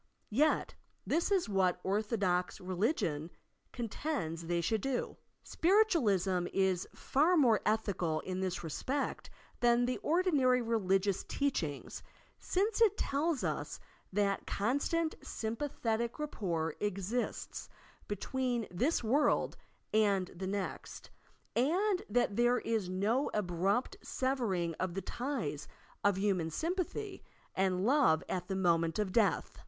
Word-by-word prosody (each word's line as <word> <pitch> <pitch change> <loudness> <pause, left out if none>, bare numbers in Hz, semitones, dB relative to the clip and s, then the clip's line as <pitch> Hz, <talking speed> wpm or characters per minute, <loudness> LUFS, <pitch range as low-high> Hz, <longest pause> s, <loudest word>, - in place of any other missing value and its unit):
Yet, 300 +8 +2 0.3
this 335 +2 +1
is 380 -8 +2
what 185 -3 +2
ortho 210 +4 0
dox 180 -2 0
religion 180 - -1 0.4
contends 230 - -3
they 175 0 +1
should 210 +5 0
do! 270 0 -2 0.3
Spiritualism 225 - +2
is 190 -2 +1
far 320 +6 +2
more 240 -8 +4
ethical 200 -7 0
in 185 0 -4
this 185 -2 -2
respect 260 - -3 0.3
than 240 0 +4
the 250 0 -1
ordinary 295 -7 +3
re 230 -1 0
ligious 195 0 +1
teachings, 170 - -2 0.4
since 410 +4 0
it 425 -2 +5
tella 300 +3 0
us - - -3 0.3
that 200 0 0
constant, 285 +9 0
sympa 230 +6 -3
thetic 230 -1 -1
rapport 170 - -2
exists 205 +4 -3 0.4
between 240 +3 -1
this 250 - +1
world 275 +7 +2 0.4
and 200 -4 +3
the 190 +2 -4
next, 195 -1 -5 0.4
and 360 - +2
that 240 -5 +1
there 240 +1 +4
is 220 -7 -1
no 210 +9 +1
abrupt 200 - 0
severing 225 -11 -1
of 185 -1 -2
the 195 - -3
ties 230 - -3 0.4
of 205 -2 +3
human 190 -5 +1
sympathy 365 - -3 0.3
and 185 0 +1
love 255 - +4
at 180 -1 -3
the 195 - -2
moment 170 -3 +2
of 210 -3 -1
death. 215 0 +1
215 Hz, 125 wpm, -33 LUFS, 185-270 Hz, 0.4 s, it